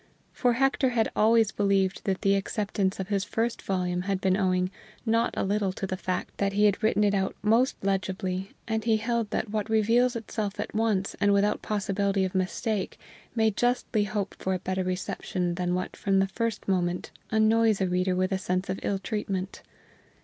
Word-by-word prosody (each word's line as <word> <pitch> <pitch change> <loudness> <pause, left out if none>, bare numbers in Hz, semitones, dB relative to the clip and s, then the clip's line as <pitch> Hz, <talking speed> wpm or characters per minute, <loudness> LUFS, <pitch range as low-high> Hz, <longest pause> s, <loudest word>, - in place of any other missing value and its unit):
For 245 -2 +2
Hector 270 +1 +2
had 230 -3 +1
always 225 0 +4
believed 195 -2 +1
that 190 -1 -1
the 195 -1 +4
acceptance 195 -1 -1
of 190 0 -4
his 200 -2 +1
first 225 +3 -2
volume 180 -2 -1
had 195 +1 -1
been 190 -1 +2
owing 185 -2 +1 0.3
not 230 0 +2
a - - +1
little 200 0 0
to 195 - -4
the 190 - -2
fact 185 0 -4
that 195 0 +1
he 210 +1 +3
had 205 +1 +2
written 215 -1 +2
it 205 -1 +3
out 190 -1 0
most 230 +5 +3
legibly, 190 -1 -1 0.2
and 220 -1 -1
he 225 -1 +3
held 230 0 -1
that 210 - -2
what 215 0 -2
reveals 230 +3 +3
itself 215 -3 -4
at - - -4
once 210 -3 0
and 205 0 +4
without 200 +1 +2
possibility 200 -1 0
of 185 - -4
mistake 190 +2 -1 0.4
may 220 -1 +3
justly 240 -1 +1
hope 205 -1 -3
for 190 0 -1
a 185 - -7
better 185 0 0
reception 180 -1 -2
than 180 0 -1
what 185 - -3
from 195 -1 +1
the 195 - +4
first 230 +2 -3
moment 180 -2 0 0.2
annoys 220 0 +3
the 190 - 0
reader 180 +1 +1
with 185 +1 0
a 190 - 0
sense 185 0 -2
of 190 - -2
ill 200 - 0
treatment. 195 -1 -3
200 Hz, 195 wpm, -27 LUFS, 190-220 Hz, 0.4 s, always